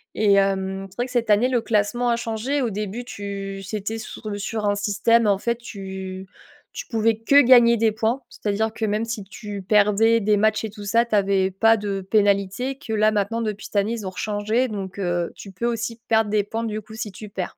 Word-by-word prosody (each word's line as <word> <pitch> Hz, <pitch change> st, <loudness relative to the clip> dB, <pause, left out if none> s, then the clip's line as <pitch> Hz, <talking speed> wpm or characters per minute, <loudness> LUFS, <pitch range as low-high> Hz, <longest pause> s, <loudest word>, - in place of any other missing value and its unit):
et 210 Hz, -2 st, +3 dB
hem, 195 Hz, -1 st, 0 dB
c'est 190 Hz, -, -20 dB
vrai 245 Hz, -, 0 dB
que -, -, -12 dB
cette 235 Hz, -3 st, 0 dB
année 210 Hz, +4 st, +4 dB
le 245 Hz, -2 st, +1 dB
classement 225 Hz, +2 st, 0 dB
a 235 Hz, -, +2 dB
changé. 235 Hz, +5 st, -2 dB
Au 245 Hz, -, 0 dB
début 210 Hz, +4 st, -4 dB
tu 200 Hz, -3 st, -6 dB
c'était 210 Hz, +2 st, -4 dB
sur 220 Hz, 0 st, -8 dB
le 205 Hz, -, -4 dB
sur 215 Hz, +1 st, -3 dB
un 205 Hz, -, +2 dB
système 210 Hz, +3 st, +2 dB
en 200 Hz, -2 st, +3 dB
fait 235 Hz, +2 st, -1 dB
tu 190 Hz, -4 st, -7 dB, 0.5 s
tu -, -, -7 dB
pouvais 225 Hz, -1 st, +1 dB
que 280 Hz, +6 st, +5 dB
gagner 240 Hz, -2 st, +6 dB
des 225 Hz, 0 st, +3 dB
points, 225 Hz, +5 st, -1 dB
c'est-à-dire 220 Hz, -2 st, -2 dB
que 225 Hz, -, -6 dB
même 210 Hz, +2 st, 0 dB
si 225 Hz, -2 st, -4 dB
tu 205 Hz, +1 st, -7 dB
perdais 210 Hz, +3 st, +4 dB
des 210 Hz, 0 st, +2 dB
matchs 215 Hz, +1 st, +2 dB
et -, -, -4 dB
tout 205 Hz, -1 st, -10 dB
ça, 230 Hz, +4 st, +3 dB
tu 235 Hz, -, -9 dB
avais 195 Hz, -1 st, +2 dB
pas 225 Hz, +4 st, +4 dB
de 200 Hz, -2 st, -3 dB
pénalité, 200 Hz, +5 st, +1 dB
que 220 Hz, -, -6 dB
là 215 Hz, 0 st, +3 dB
maintenant 210 Hz, +2 st, -1 dB
depuis 215 Hz, -1 st, -4 dB
cette -, -, -20 dB
année 200 Hz, +2 st, +2 dB
ils 215 Hz, -4 st, -5 dB
ont -, -, -4 dB
rechangé 210 Hz, +6 st, -1 dB
donc, 195 Hz, -3 st, -6 dB
heu, 175 Hz, -2 st, -1 dB
tu 195 Hz, -, -10 dB
peux 210 Hz, +6 st, -3 dB
aussi 230 Hz, 0 st, -3 dB
perdre 220 Hz, -2 st, +2 dB
des 210 Hz, -1 st, +2 dB
points 225 Hz, +3 st, -4 dB
du 215 Hz, -1 st, -3 dB
coup 220 Hz, +1 st, -13 dB
si 220 Hz, -2 st, -5 dB
tu 210 Hz, +3 st, -10 dB
perds. 190 Hz, -3 st, -5 dB
215 Hz, 230 wpm, -23 LUFS, 200-230 Hz, 0.5 s, gagner